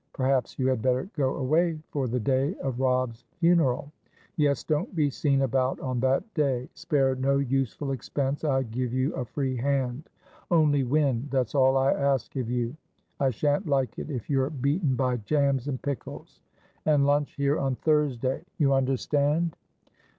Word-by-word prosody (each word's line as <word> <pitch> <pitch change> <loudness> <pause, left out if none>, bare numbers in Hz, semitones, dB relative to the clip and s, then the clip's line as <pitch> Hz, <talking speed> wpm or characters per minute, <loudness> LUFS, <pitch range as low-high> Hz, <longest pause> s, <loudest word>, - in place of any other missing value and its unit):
Perhaps 130 -2 0
you 130 - 0
had 130 -4 +1
better 130 +7 +1
go 135 -3 0
away 160 +5 +1
for 135 -3 -1
the 125 +2 -1
day 135 - +1
of 130 -2 -4
Robb's 125 -2 0
funeral. 160 -5 +2 0.4
Yes, 145 -2 +1
don't 165 +6 -1
be 150 -3 +2
seen 135 0 +1
about 130 0 0
on 130 -2 -2
that 130 +2 +2
day. 135 -5 0
Spare 135 -3 +1
no 135 +1 +1
useful 135 +1 -1
expense; 135 +2 -2
I 135 -3 +2
give 120 +1 -3
you 130 +3 0
a 130 - -3
free 130 +2 -2
hand. 130 +1 -1 0.4
Only 150 -5 +3
win; 135 -1 +1
that's 130 -4 0
all 135 -1 +4
I 135 +1 +3
ask 140 -1 0
of 125 -3 -2
you. 120 +1 -1 0.4
I 135 - +3
shan't 145 - 0
like 135 -3 0
it - - -6
if 125 -7 -5
you're 135 -1 +1
beaten 140 +1 0
by 125 -1 0
jams 140 +2 0
and 130 -3 -2
pickles. 140 -2 -6 0.4
And 150 -2 +3
lunch 145 0 +1
here 140 +1 +1
on 135 -2 0
Thursdayyou 140 +1 0
understand?" 145 +5 +1
135 Hz, 165 wpm, -27 LUFS, 130-145 Hz, 0.4 s, all